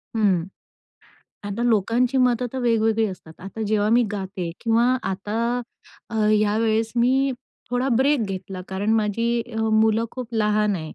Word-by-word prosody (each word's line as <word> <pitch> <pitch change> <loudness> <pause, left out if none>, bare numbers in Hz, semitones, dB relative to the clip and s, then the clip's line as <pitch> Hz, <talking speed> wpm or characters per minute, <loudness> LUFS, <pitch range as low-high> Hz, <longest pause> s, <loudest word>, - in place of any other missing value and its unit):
हं. 195 -6 +2 1.1
आता 215 +4 -3
लोकांची 240 +3 +2
मतं 250 -1 +2
तर 265 - -3
वेगवेगळी 225 -2 +2
असतात. 175 -4 -10
आता 195 +4 -6
जेव्हा 210 0 +1
मी 240 +1 +5
गाते 190 -3 -4
किंवा 230 0 +2 0.3
आता 205 +3 -4 0.7
अ, - - -6 0.2
यावेळेस 220 +1 +1
मी 265 +3 +3 0.4
थोडा 250 +2 0
ब्रेक 275 0 +3
घेतला 190 -1 -6
कारण 200 +3 -1
माझी 230 +2 0 0.2
अ, - - -1
मुलं 220 +1 +3
खूप 250 -3 -7
लहान 210 -1 +2
आहेत. 155 -2 -7
220 Hz, 145 wpm, -23 LUFS, 205-235 Hz, 1.1 s, मी